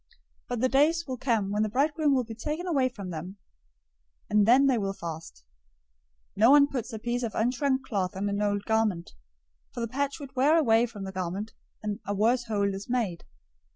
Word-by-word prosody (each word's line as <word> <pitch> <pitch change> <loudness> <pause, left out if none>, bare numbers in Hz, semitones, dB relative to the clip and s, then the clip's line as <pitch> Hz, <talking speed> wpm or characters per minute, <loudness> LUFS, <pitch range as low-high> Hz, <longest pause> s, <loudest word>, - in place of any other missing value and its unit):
But 245 -2 -2
the 255 - +4
days 305 +6 +2
will 260 -2 -5
come 225 -6 0
when 210 +1 0
the 215 - +1
bridegroom 290 +4 +2
will 255 - +1
be 225 -1 -8
taken 300 +10 -4
away 275 -8 +1
from 200 -7 -8
them, 175 +5 -7 0.9
and 210 0 +4
then 260 +4 +6
they 260 -4 +3
will 195 -1 -2
fast. 160 - -8 0.9
009:016 - - -28
No 220 +4 +6
one 285 +1 +7
puts 265 -5 -5
a 220 - -5
piece 240 +3 -2
of 230 -4 -4
unshrunk 260 +3 +1
cloth 195 -5 -2
on 200 +1 -1
an 200 0 -1
old 205 -1 0
garment; 220 -6 0 0.6
for - - -7
the 230 - -1
patch 280 +5 -2
would 280 -2 -9
tear 285 +5 +4
away 235 -6 +4
from 210 -4 -9
the 190 - -5
garment, 190 +4 -4 0.3
and 210 0 -3
a 205 - -1
worse 235 +4 +2
hole 200 -3 0
is 195 +3 -7
made. 225 -9 -1
225 Hz, 205 wpm, -27 LUFS, 200-265 Hz, 0.9 s, one